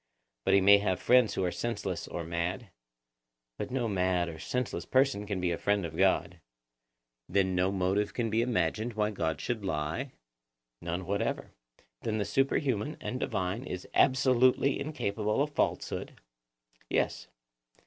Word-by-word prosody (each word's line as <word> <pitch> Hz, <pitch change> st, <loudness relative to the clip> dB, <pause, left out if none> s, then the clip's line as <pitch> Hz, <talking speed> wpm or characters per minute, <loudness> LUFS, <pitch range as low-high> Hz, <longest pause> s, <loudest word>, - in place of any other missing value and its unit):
But -, -, +4 dB
he 100 Hz, -, +5 dB
may 100 Hz, +1 st, +7 dB
have 95 Hz, -3 st, 0 dB
friends 125 Hz, -3 st, +4 dB
who 95 Hz, -, 0 dB
are 90 Hz, -, 0 dB
senseless 120 Hz, +4 st, -3 dB
or 85 Hz, -, -4 dB
mad? 85 Hz, +5 st, -3 dB, 0.9 s
But -, -, -3 dB
no 125 Hz, -2 st, -1 dB
mad 90 Hz, -3 st, +1 dB
or 80 Hz, -1 st, -8 dB
senseless 125 Hz, +6 st, -2 dB
person 130 Hz, -6 st, +2 dB
can 100 Hz, -2 st, -2 dB
be 90 Hz, -1 st, 0 dB
a 85 Hz, -, -2 dB
friend 100 Hz, -3 st, +1 dB
of 80 Hz, -1 st, -6 dB
God. 90 Hz, -2 st, +2 dB, 0.9 s
Then 95 Hz, 0 st, +2 dB
no 90 Hz, +1 st, +2 dB
motive 95 Hz, +2 st, 0 dB
can 115 Hz, -3 st, -2 dB
be 110 Hz, +1 st, +2 dB
imagined 110 Hz, 0 st, 0 dB
why 105 Hz, 0 st, +1 dB
God 80 Hz, -7 st, -2 dB
should 110 Hz, +5 st, -3 dB
lie? 85 Hz, -, -2 dB, 0.7 s
None 85 Hz, +2 st, -3 dB
whatever. 100 Hz, +3 st, -2 dB, 0.5 s
Then 110 Hz, -1 st, -1 dB
the 105 Hz, -, 0 dB
superhuman 135 Hz, +3 st, 0 dB
and 125 Hz, -, -4 dB
divine 95 Hz, -6 st, -2 dB
is 90 Hz, 0 st, -6 dB
absolutely 130 Hz, +1 st, +4 dB
incapable 110 Hz, -7 st, -1 dB
of 150 Hz, -, -4 dB
falsehood? -, -, -2 dB, 0.7 s
Yes. -, -, 0 dB
100 Hz, 150 wpm, -30 LUFS, 90-120 Hz, 0.9 s, may